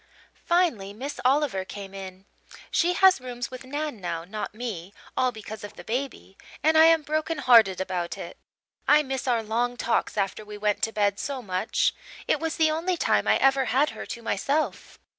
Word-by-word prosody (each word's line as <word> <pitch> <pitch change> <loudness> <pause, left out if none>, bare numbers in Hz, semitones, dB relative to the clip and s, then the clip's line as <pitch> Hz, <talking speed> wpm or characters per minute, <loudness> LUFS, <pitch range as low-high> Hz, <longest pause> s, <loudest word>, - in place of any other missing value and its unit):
"Finally, 315 - +1
Miss 270 +7 -6
Oliver 260 -6 +2
came 195 0 -9
in. 190 -1 -9 0.5
She 350 +1 +2
has 375 -5 +5
rooms 245 -1 -5
with 255 0 -8
Nan 290 -1 -3
now, 165 -2 -3
not 210 +2 -5
me, 205 -5 -6 0.2
all 255 -1 +2
because 220 -2 -9
of 205 0 -9
the 175 - -10
baby, 245 -3 -4 0.2
and 315 +1 +4
I 315 0 +8
am 325 -1 +5
broken 310 +2 -1
hearted 225 -8 +5
about 185 -1 -3
it. 175 -3 -8 0.5
I 300 +1 +6
miss 265 -2 -4
our 235 -3 +2
long 240 +3 -1
talks 230 -2 0
after 200 +1 -1
we 210 0 -9
went 210 0 0
to 225 - -7
bed, 205 -2 +1
so 270 -3 -4
much. 185 +2 0 0.3
It - - +2
was 325 0 -3
the 315 -2 +4
only 340 +3 -1
time - - +1
I - - +5
ever 270 0 +3
had 275 +5 +2
her - - -8
to 235 - -7
myself. 280 +9 -1
240 Hz, 190 wpm, -26 LUFS, 200-290 Hz, 0.5 s, I